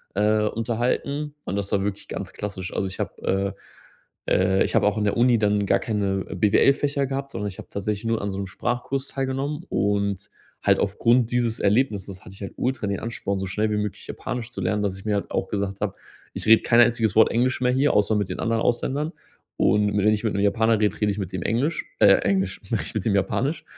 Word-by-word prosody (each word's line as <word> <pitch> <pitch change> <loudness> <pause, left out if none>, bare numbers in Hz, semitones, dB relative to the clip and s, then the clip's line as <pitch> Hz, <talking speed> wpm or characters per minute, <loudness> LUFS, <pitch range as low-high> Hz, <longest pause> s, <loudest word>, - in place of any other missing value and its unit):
äh, 105 +1 +3
unterhalten 125 +7 -1
und 95 - -3
das 100 -1 -2
war 100 -2 +1
wirklich 100 0 -4
ganz - - -5
klassisch. 95 -3 -5
Also 95 - -1
ich 95 - -8
habe, 100 +1 -2 0.7
äh - - -3
äh 95 +1 +3
ich - - -2
habe - - +4
auch 105 - +1
in 105 - 0
der 105 - +1
Uni 120 -1 +4
dann 105 -1 +2
gar 100 0 +3
keine 100 -2 -1
BWL-Fächer 140 +6 +3
gehabt, 140 +1 -4
sondern 105 - -3
ich 95 - -11
habe - - -10
tatsächlich 100 +2 -3
nur 115 -2 0
an 100 - -2
so 95 - -4
'n 100 - -3
Sprachkurs 125 +6 -3
teilgenommen 135 +3 -3
und 100 -1 0 0.3
halt - - +4
aufgrund 115 +4 +2
dieses 120 -1 0
Erlebnisses 100 -4 0
hatte 105 - -11
ich - - -15
halt 100 - -6
ultra 125 -5 -1
den 100 -1 -2
Ansporn, 100 -4 -3
so 95 - -2
schnell 105 +3 -1
wie 105 - 0
möglich 105 -1 -4
Japanisch 120 -1 -5
zu 100 - -7
lernen, 105 +3 0
dass 95 -2 -1
ich 95 - -14
mir 105 -1 +1
halt 100 - -3
auch - - -1
gesagt 100 -1 -3
habe: 105 -3 -2 0.4
„Ich - - -5
rede 110 0 +7
kein 120 - +4
einziges 115 -3 +2
Wort 110 - +6
Englisch 125 +2 +1
mehr 125 0 +3
hier, 135 +3 +3
außer 105 +1 +3
mit 105 -2 0
den 90 - -5
anderen 115 0 0
Ausländern.“ 140 +7 0 0.4
Und 105 0 +2
wenn 105 +1 +4
ich 105 - -2
mit 110 - 0
'nem 100 +1 0
Japaner 110 +2 +3
rede, 105 -1 0
rede 105 -1 +3
ich 100 - -4
mit 95 -2 -4
dem 90 - -3
Englisch 140 +9 0
äh, - - +7 0.2
Englisch, 95 -1 0
rede 110 - 0
ich - - -8
mit 105 - -2
dem 100 -3 +2
Japanisch. 140 - 0
105 Hz, 230 wpm, -24 LUFS, 100-120 Hz, 0.7 s, rede